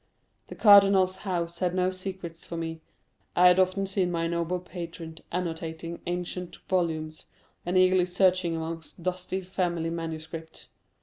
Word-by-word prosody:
The -, -, -9 dB
cardinal's 195 Hz, -3 st, +6 dB
house 170 Hz, -3 st, -3 dB
had 180 Hz, -1 st, 0 dB
no 185 Hz, 0 st, +2 dB
secrets 185 Hz, -3 st, -7 dB
for 170 Hz, -, -6 dB
me. 165 Hz, -1 st, -4 dB, 0.5 s
I 180 Hz, +1 st, +7 dB
had 180 Hz, +1 st, +4 dB
often 185 Hz, +1 st, +2 dB
seen 190 Hz, -2 st, 0 dB
my 165 Hz, -1 st, -1 dB
noble 170 Hz, +1 st, -1 dB
patron 170 Hz, -2 st, -8 dB
annotating 165 Hz, -1 st, -4 dB
ancient 180 Hz, 0 st, -3 dB
volumes, 160 Hz, -4 st, -1 dB, 0.4 s
and 180 Hz, +1 st, +2 dB
eagerly 185 Hz, -1 st, +4 dB
searching 180 Hz, -2 st, +2 dB
amongst 165 Hz, +1 st, -6 dB
dusty 185 Hz, +1 st, -2 dB
family 175 Hz, -3 st, -1 dB
manuscripts. 160 Hz, -1 st, -6 dB
175 Hz, 135 wpm, -27 LUFS, 165-185 Hz, 0.5 s, I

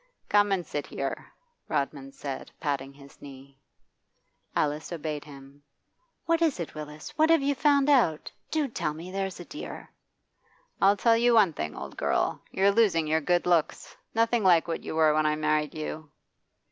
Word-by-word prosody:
'Come 205 Hz, -1 st, +4 dB
and 185 Hz, -3 st, 0 dB
sit 145 Hz, -1 st, -4 dB
here,' 135 Hz, -1 st, -5 dB, 0.4 s
Rodman 140 Hz, -1 st, -2 dB
said, 135 Hz, -1 st, -6 dB
patting 140 Hz, -2 st, -2 dB
his 140 Hz, 0 st, -17 dB
knee. 135 Hz, -1 st, -13 dB, 1.0 s
Alice 150 Hz, +2 st, -1 dB
obeyed 155 Hz, -3 st, -4 dB
him. 140 Hz, -1 st, -14 dB, 0.6 s
'What 335 Hz, 0 st, +1 dB
is 315 Hz, -, +2 dB
it, 170 Hz, -, -5 dB
Willis? 150 Hz, 0 st, -9 dB
What 315 Hz, +1 st, +5 dB
have 330 Hz, -4 st, +4 dB
you 285 Hz, +1 st, +2 dB
found 280 Hz, -1 st, +3 dB
out? 235 Hz, -, +2 dB, 0.2 s
Do 310 Hz, -3 st, 0 dB
tell 150 Hz, -, -3 dB
me, 170 Hz, +3 st, -8 dB
there's 195 Hz, -2 st, -3 dB
a 175 Hz, -, -8 dB
dear!' 300 Hz, -, -9 dB, 0.9 s
'I'll 200 Hz, +1 st, +5 dB
tell 230 Hz, +2 st, +4 dB
you 240 Hz, 0 st, +4 dB
one 200 Hz, -7 st, +5 dB
thing, 75 Hz, -, -4 dB
old -, -, -8 dB
girl: -, -, 0 dB
you're 195 Hz, +1 st, +3 dB
losing 200 Hz, -7 st, +3 dB
your 160 Hz, +1 st, +1 dB
good 175 Hz, +3 st, +1 dB
looks. 175 Hz, -3 st, 0 dB, 0.2 s
Nothing 230 Hz, 0 st, +2 dB
like 175 Hz, -3 st, +5 dB
what 165 Hz, -, -3 dB
you -, -, -5 dB
were 155 Hz, -1 st, +4 dB
when 155 Hz, 0 st, +2 dB
I 150 Hz, -, +1 dB
married 155 Hz, -1 st, 0 dB
you. 155 Hz, 0 st, -6 dB
160 Hz, 170 wpm, -27 LUFS, 150-205 Hz, 1.0 s, What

